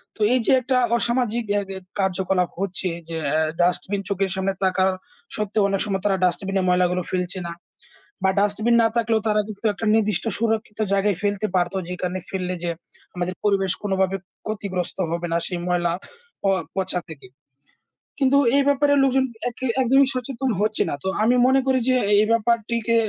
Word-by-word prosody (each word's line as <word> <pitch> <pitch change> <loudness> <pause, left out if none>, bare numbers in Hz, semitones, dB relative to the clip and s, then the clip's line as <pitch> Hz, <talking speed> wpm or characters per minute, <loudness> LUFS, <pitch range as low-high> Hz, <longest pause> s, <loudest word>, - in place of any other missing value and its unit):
তো 220 - -11
এই 255 - +3
যে, - - +3
একটা 255 +1 +1 0.2
অসামাজিক 235 -1 0
অ্যা 205 0 +2
অ্যা 190 -1 -5 0.2
কার্যকলাপ 190 -1 +1
হচ্ছে 190 -1 -1 0.2
যে, 165 - -3
অ্যা 155 +2 +2 0.2
ডাস্টবিন 180 +3 +1
চোখের 195 -1 0
সামনে 190 0 -1
থাকা 185 0 +2 0.5
সত্ত্বেও 210 -1 0
অনেক 195 -1 0
সময় 195 -2 -2
তারা 195 -2 +2
ডাস্টবিনে 190 +2 0
ময়লাগুলো 180 0 +2
ফেলছে 180 0 -2
না। - - -5 0.7
বা 190 - +4
ডাস্টবিন 210 +3 +2
না - - +4
থাকলেও 225 -1 +2
তারা 210 -1 +3
কিন্তু 215 +1 -5
একটা 215 +2 -5
নির্দিষ্ট 210 -3 +1
সুরক্ষিত 220 -1 -1
জায়গায় 200 -1 +2
ফেলতে 205 0 0
পারত, 175 +1 +1
যেখানে 180 0 -3
ফেললে 185 -1 -2
যে, 170 - 0 0.4
আমাদের 180 0 -3
পরিবেশ 195 -3 +2
কোনোভাবে 190 -1 0 0.3
ক্ষতিগ্রস্ত 200 -5 -3
হবে 170 +1 -2
না 170 - +2
সেই 180 - -3
ময়লা 175 -1 +1 0.5
প - - -27 0.3
পচা 190 -1 0
থেকে। 160 -4 -10 0.9
কিন্তু 275 0 +4 0.2
এ - - +5
ব্যাপারে 285 0 +3
লোকজন 265 0 +3 0.2
এ - - +1 0.3
একদমই 270 +2 +4
সচেতন 255 +1 -3
হচ্ছে 215 +1 +2
না। - - -2
তো - - -3 0.2
আমি 240 +3 +4
মনে 265 +1 +4
করি 260 -1 +3
যে, 255 - +4 0.3
এই - - +3
ব্যাপারটিকে 230 0 +1
200 Hz, 170 wpm, -23 LUFS, 185-230 Hz, 0.9 s, এ